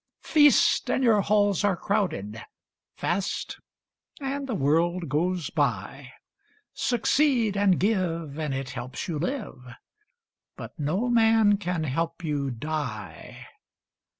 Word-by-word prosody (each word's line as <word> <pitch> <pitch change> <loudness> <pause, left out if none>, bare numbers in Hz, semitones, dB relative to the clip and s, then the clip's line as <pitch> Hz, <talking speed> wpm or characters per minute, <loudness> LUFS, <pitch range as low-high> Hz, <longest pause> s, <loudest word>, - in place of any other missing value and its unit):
Feast, 295 -3 +4
and 265 - +1
your 220 -4 +4
halls 205 -2 +2
are 200 -3 +2
crowded; 115 - -2 0.5
Fast, 185 +2 -2 0.6
and 275 0 -4
the 245 - -2
world 165 +2 +1
goes 170 +2 -1
by. - - -2 0.6
Succeed 240 -2 +1
and 200 -2 +3
give, 170 -7 -1
and 155 -2 -2
it 135 -1 -4
helps 125 +2 -6
you 160 -4 -3
live, 160 - -5 0.8
But - - -8
no 180 +11 0
man 225 -3 +4
can 180 -5 -2
help 165 +4 -3
you 145 -3 -1
die. 125 -6 -6
180 Hz, 115 wpm, -26 LUFS, 150-215 Hz, 0.8 s, Feast